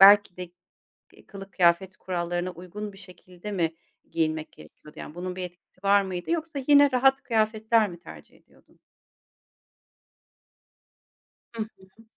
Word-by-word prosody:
belki 200 -1 +8
de, 180 -1 -7 0.6
eee, - - -19
kılık 195 0 -10
kıyafet 180 +1 +3
kurallarına 175 0 -2
uygun 185 +4 -7
bir - - -14
şekilde 185 +1 -10
mi 165 -5 0 0.4
giyinmek 155 -1 -1
gerekiyordu, 75 - -15
yani, 150 - -8
bunun 180 +1 -4
bir 185 - -4
etkisi 180 +1 -12
var 200 0 +5
mıydı 185 - -4
yoksa 325 -3 -2
yine 285 -1 +7
rahat 270 +2 +4
kıyafetler 220 -1 +2
mi 175 -1 -10
tercih - - -13
ediyordun? - - -26 2.8
Hı 225 - -3
hı. 190 0 -18
190 Hz, 135 wpm, -27 LUFS, 175-215 Hz, 2.8 s, belki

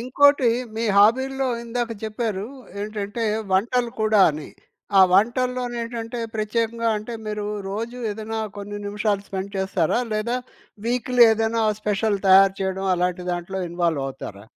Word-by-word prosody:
ఇంకోటి 265 +1 +4 0.3
మీ 230 - -1
హాబీల్లో 260 +6 +4 0.2
ఇందాక 235 0 -2
చెప్పారు. 215 -2 -3 0.3
ఏంటంటే, 210 +2 -3 0.3
వంటలు 235 +5 +1
కూడా 215 -1 +4
అని. 150 0 -7 0.5
ఆ - - +9
వంటల్లోనేంటంటే, 240 +1 0
ప్రత్యేకంగా 230 +2 -1
అంటే 215 +3 -6
మీరు 210 -1 -3 0.2
రోజు 230 +4 -4
ఏదైనా 220 +1 -4 0.2
కొన్ని 205 +1 -6
నిమిషాలు 205 -1 -1
స్పెండ్ 195 +1 -5
చేస్తారా? 190 +1 +1
లేదా 225 +4 -1 0.5
వీక్‌లీ 250 0 +4
ఏదైనా 225 +1 0 0.2
స్పెషల్ 210 0 0
తయారు 195 0 +7
చేయడం 190 0 -2
అలాంటి 180 0 -1
దాంట్లో 175 +2 -4
ఇన్‌వాల్వవుతారా? 135 - -3
215 Hz, 120 wpm, -23 LUFS, 195-235 Hz, 0.5 s, ఆ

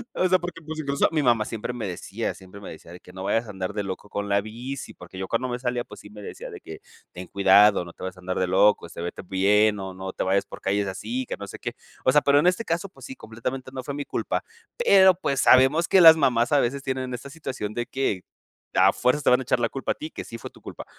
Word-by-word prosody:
O 185 - +2
sea, 185 0 +3
porque 175 0 -7
pues, 160 0 -6
incluso 140 -2 +1
mi 155 -2 +1
mamá 120 -4 +3
siempre 115 +2 -4
me 115 -4 -4
decía, 90 - -4
siempre 95 +1 -13
me - - -8
decía 80 +1 -12
de 90 - -11
que: 90 - -16
"No 95 0 -7
vayas 115 +3 0
a - - -7
andar 95 -2 -4
de 105 - -2
loco 95 +1 -6
con 100 0 -3
la 100 0 +3
bici", 120 +6 -7
porque 90 +1 -12
yo 95 - -4
cuando 120 +3 -1
me 120 0 -3
salía, 125 -1 -2
pues - - -13
sí 105 - -13
me 105 0 -11
decía - - -8
de - - -9
que: - - -10 0.3
"Ten 90 +1 -9
cuidado, 100 0 +5
no 85 - -11
te - - -18
vayas 95 0 -5
a - - -13
andar 90 0 -3
de 95 - +1
loco, 100 0 +3
este, 85 - -9
vete 85 - -5
bien 105 +3 +2
o 95 -1 -6
no 95 0 -7
te - - -2
vayas 95 +1 +1
por - - -11
calles 100 +1 0
así, 240 - -4
que - - -5
no 100 - -7
sé - - -9
qué". - - -5 0.3
O 130 - +5
sea, 150 - +5
pero 140 0 +4
en 170 - +3
este 185 +6 +1
caso, 170 +4 -2
pues - - -14
sí, 265 - -8
completamente 125 - -6
no 130 -1 -5
fue 140 - -5
mi 145 0 -4
culpa. - - -2 0.3
Pero, 190 - +6
pues, 140 -7 -1
sabemos 135 +6 +5
que 190 - +5
las 160 -1 +10
mamás 120 -5 +2
a 145 - +5
veces 135 +2 -1
tienen 130 -1 -3
esta 130 +3 -7
situación 130 -9 -5
de 120 - -2
que 110 -9 -2 0.5
a - - +6
fuerzas 140 +4 +1
te - - +4
van 125 - +5
a - - -4
echar 120 - +1
la 120 -1 +1
culpa 135 - -3
a - - -28
ti, 155 - -7
que - - -7
sí 115 - -8
fue - - -8
tu - - -19
culpa. - - -9
120 Hz, 285 wpm, -25 LUFS, 100-140 Hz, 0.5 s, las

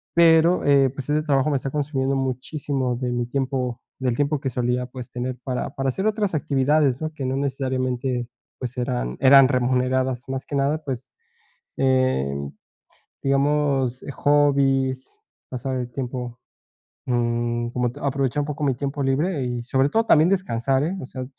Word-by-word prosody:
pero, 170 +1 +5
eh, 140 -2 +5
pues, 135 +1 -7
ese 150 +1 +2
trabajo 140 -1 +2
me 140 - +1
está 135 - -4
consumiendo 140 -1 -1
muchísimo 135 0 -2
de 125 0 -2
mi 120 0 -1
tiempo 130 -2 -2 0.2
del 125 -2 0
tiempo 145 +2 0
que 135 - -2
solía, 125 0 -1
pues, 125 -1 -9
tener 125 +1 -4
para 130 0 -3
para 135 -1 0
hacer 190 +11 -1
otras 210 -3 0
actividades, 140 -2 +2
¿no?, 155 0 -2
que 140 -3 -5
no 130 +1 -1
necesariamente, 130 -2 -1 0.3
pues, 125 0 -6
eran 60 - -2
eran 135 0 +8
remuneradas 130 0 +1
más 135 +1 -3
que 145 - -5
nada, 140 +3 +1
pues, 130 -4 -5 0.7
em, 70 - +1 0.7
digamos, 140 -2 +1
hobbies, 135 - +2 0.3
pasar 130 +1 -3
el 125 -1 -3
tiempo, 125 -2 -5 0.7
mm, 120 -1 0
como 125 0 -1
te 145 - -12
aprovechar 140 0 0
un - - -4
poco 150 0 -5
mi 135 -2 +2
tiempo 140 +2 -3
libre 145 +4 0
y 120 -1 -3
sobre 135 +3 +1
todo 225 +6 +2
también 155 -3 +5
descansar, 135 -8 +1
eh, 180 +5 -2
o - - -6
sea, 130 -1 -6
135 Hz, 165 wpm, -23 LUFS, 125-145 Hz, 0.7 s, eran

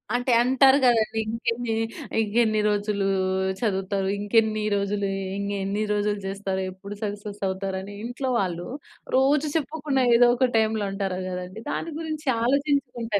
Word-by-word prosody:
అంటే 245 +1 0
అంటారు 265 +2 +5
కదండీ! 225 -2 +3
ఇంకెన్ని, 230 +1 -2 0.5
ఇంకెన్ని 220 0 +2
రోజులు 205 -1 0 0.5
చదువుతావు. 195 -3 -1
ఇంకెన్ని 215 +1 +2
రోజులు, 200 0 -1 0.3
ఇంగె‌న్ని 200 +1 -2
రోజులు 205 0 0
చేస్తావు? 195 -1 -3
ఎప్పుడు 200 +2 -9
సక్సెస్ 205 0 -5
అవుతారని 190 +1 -4
ఇంట్లో 245 +3 -3
వాళ్ళు, 175 -2 -2 0.5
రోజు 275 +3 +3
చెప్పకున్నా 295 -3 0
ఏదో 245 +1 +7
ఒక 255 +1 +3
టైంలో 220 -1 +1
అంటారు 195 -2 -2
కదండీ! 180 +3 -6
దాని 330 - -3
గురించి 310 -2 -5
ఆలోచించుకుంటా, 250 -4 0
215 Hz, 125 wpm, -25 LUFS, 200-245 Hz, 0.5 s, ఏదో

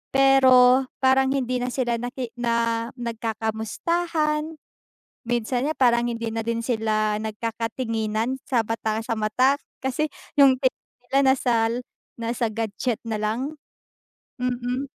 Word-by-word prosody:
pero 260 -1 +6 0.2
parang 265 0 +4
hindi 255 -2 -1
na 250 - -2
sila 245 -2 -1
naki 245 0 -5
na 230 -1 0
nagkakamustahan. 250 - -2 0.7
Minsan 240 +2 -1
nga, 310 - 0
parang 240 -3 +3
hindi 230 -1 -2
na 225 0 -3
din 230 0 -1
sila 215 -3 0
nagkakatinginan 225 +2 -2
sa 245 -5 +2
bata 220 -1 -1
sa 230 0 -2
mata 255 +6 +3 0.3
kasi 265 +4 0 0.3
yung 275 -2 +7
tingin 260 -1 0 0.3
nila 275 - +3
nasa 250 -2 0 0.7
nasa 235 +1 -1
gadget 225 +1 -2
na 220 - -1
lang. 235 +8 -2 0.9
Hmm, 250 0 0
hmm. 250 +2 -2
240 Hz, 125 wpm, -24 LUFS, 225-265 Hz, 0.9 s, yung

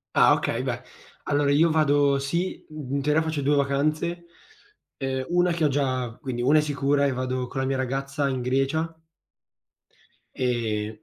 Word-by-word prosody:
Ah, - - +6
ok. - - -1
Beh, - - -3 0.4
allora, 145 0 +1
io 160 +4 +4
vado 145 -3 +3
sì, 170 +7 -2
in 140 -3 -4
teoria 150 +3 +2
faccio 160 -2 -2
2 145 +1 +2
vacanze, 155 +5 0 0.7
ehm, 130 -1 -2
una 175 0 +3
che 165 -2 +1
ho - - +5
già 130 -4 -1
quindi, 130 -4 -3
1 145 +5 +5
è - - +3
sicura 145 -1 +1
e 140 - +2
vado 130 0 -2
con 135 - -5
la 130 - -1
mia 135 - 0
ragazza 135 +2 -2
in 130 -2 -2
Grecia. 135 +6 0 1.4
E, 110 -4 -2
140 Hz, 165 wpm, -25 LUFS, 130-150 Hz, 1.4 s, Ah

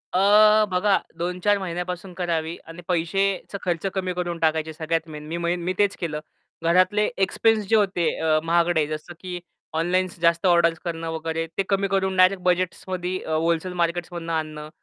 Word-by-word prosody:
अ, 210 +2 +6
बघा. 195 +2 +3 0.2
2-4 180 +4 +1
महिन्यापासून 180 0 -5
करावी 170 -2 -2
आणि 165 +2 -10
पैशाचा 190 +3 0
खर्च 175 0 -2
कमी 185 -2 -2
करून 175 -1 -3
टाकायचे. 160 0 0
सगळ्यात 165 +1 -2
मेन, 150 0 -8
मी 170 +1 -1
मी 180 +1 -2
तेच 205 -1 +3
केलं. 155 -3 -2 0.4
घरातले 185 +5 +3 0.2
एक्सपेन्स 220 +1 +1
जे 225 - +5
होते, 190 -5 +2
अ, 155 -1 +2
महागडे, 170 -2 +2
जसं 155 +3 -6
की 180 -1 -6 0.4
ऑनलाईन 185 +2 +1
जास्त 170 +1 +3
ऑर्डर्स 170 -1 +4
करणं 165 -1 -3
वगैरे, 160 0 -3
ते 195 - +2
कमी 195 0 +2
करून 190 -1 0
डायरेक्ट 185 0 +5
बजेट्समध्ये 180 0 -1
अ, 160 - -2
व्होलसेल 170 +2 0
मार्केट्समधनं 170 0 -2
आणणं. 155 -1 -4
175 Hz, 160 wpm, -24 LUFS, 165-185 Hz, 0.4 s, अ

